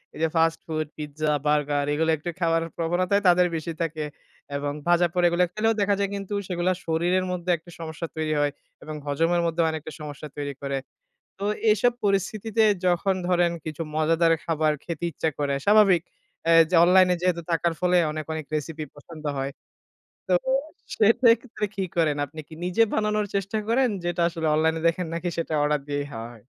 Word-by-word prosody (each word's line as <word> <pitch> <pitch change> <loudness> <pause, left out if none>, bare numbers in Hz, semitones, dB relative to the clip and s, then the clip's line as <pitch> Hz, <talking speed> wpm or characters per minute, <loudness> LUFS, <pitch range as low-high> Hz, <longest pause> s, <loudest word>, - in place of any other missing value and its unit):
এইযে 160 +1 0
fast 165 0 +3
food, 155 -1 -2
pizza, 150 0 -2
burger 145 -1 +1
এগুলা 160 +2 +2
একটু 165 +4 -5
খাবার 165 -1 +2 0.2
প্রবণতায় 180 +4 +1
তাদের 180 0 +5
বেশি 160 +1 -3
থাকে। 160 -2 -2 0.5
এবং 145 0 -2
ভাজাপোড়া 175 0 +3
এগুলা 175 +1 +3
খেলেও 225 +1 +2
দেখা 200 0 +3
যায় 200 - 0
কিন্তু 200 +1 -5
সেগুলা 180 0 0
শরীরের 175 +3 +1
মধ্যে 180 0 -4
একটা 170 +2 -16
সমস্যা 165 0 -5
তৈরি 155 -1 -1
হয় 145 - +1 0.3
এবং 155 - -6
হজমের 165 +4 +1
মধ্যেও 165 0 +1
অনেকটা 155 0 -6
সমস্যা 150 0 -7
তৈরি 145 -1 -3
করে। 140 -1 -2 0.6
তো 200 - -4 0.3
এসব 235 +3 +3
পরিস্থিতিতে 205 +3 +1 0.2
যখন 180 +2 +2
ধরেন 175 -1 +3
কিছু 155 0 -4
মজাদার 165 +1 +3
খাবার 155 -2 +1
খেতে 170 0 -4
ইচ্ছা 160 +1 -2
করে। 140 -1 0
স্বাভাবিক 200 -5 +6 0.5
আ - - +6 0.2
যে - - -1
অনলাইনে 180 0 +5
যেহেতু 175 -2 +1
থাকার 170 0 +1
ফলে 180 0 +3 0.2
অনেক, 155 0 -4
অনেক 160 -2 -4
রেসিপি 155 +1 -3
পছন্দ 155 +1 -12
হয়। 135 +1 -2 0.8
তো 185 - +2 0.6
সেক্ষেত্রে 230 0 +3
কি 195 - -1
করেন? 160 -4 +2
আপনি 155 +3 -12
কি 160 - -13
নিজে 180 +6 +3
বানানোর 210 -1 +1
চেষ্টা 195 +2 -1
করেন? 250 +2 +3
যেটা 175 0 -1
আসলে 165 -2 -3
অনলাইনে 160 +1 +1
দেখেন, 170 +1 0
নাকি 170 +1 -2
সেটা 165 -1 -2
অর্ডার 150 -1 +1
দিয়েই 145 0 -2
হাওয়া 115 +1 -6
হয়? 110 - -17
165 Hz, 170 wpm, -25 LUFS, 155-185 Hz, 0.8 s, স্বাভাবিক